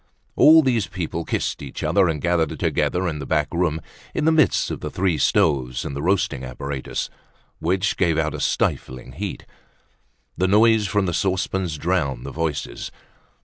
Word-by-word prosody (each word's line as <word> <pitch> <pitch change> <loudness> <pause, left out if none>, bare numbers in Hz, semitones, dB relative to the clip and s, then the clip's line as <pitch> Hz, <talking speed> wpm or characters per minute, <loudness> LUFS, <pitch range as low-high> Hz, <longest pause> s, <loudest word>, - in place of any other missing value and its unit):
All 160 +1 +7
these 120 -7 +1
people 85 -2 -4
kissed - - -2
each 70 - -7
other 100 -2 +3
and 80 -2 -2
gathered 85 -1 0
together 90 +1 0
in 75 -3 -3
the - - -5
back 75 -3 +1
room 85 -2 0 0.4
in - - 0
the 160 - +5
midst 160 -1 +3
of - - -4
the - - -5
three 90 -5 0
stoves 65 -6 +1
and 70 - -5
the 70 - -3
roasting 85 -6 0
apparatus, 65 +2 -4 0.5
which 90 +2 0
gave 85 -4 +2
out 80 -1 0
a - - -5
stifling 65 0 -1
heat. 95 +9 -6 0.9
The 95 - +1
noise 110 +1 +4
from 100 +1 +1
the 90 - -1
saucepans 95 -2 -1
drowned 70 -7 -1
the - - -5
voices. 80 -3 -3
85 Hz, 170 wpm, -22 LUFS, 75-95 Hz, 0.9 s, All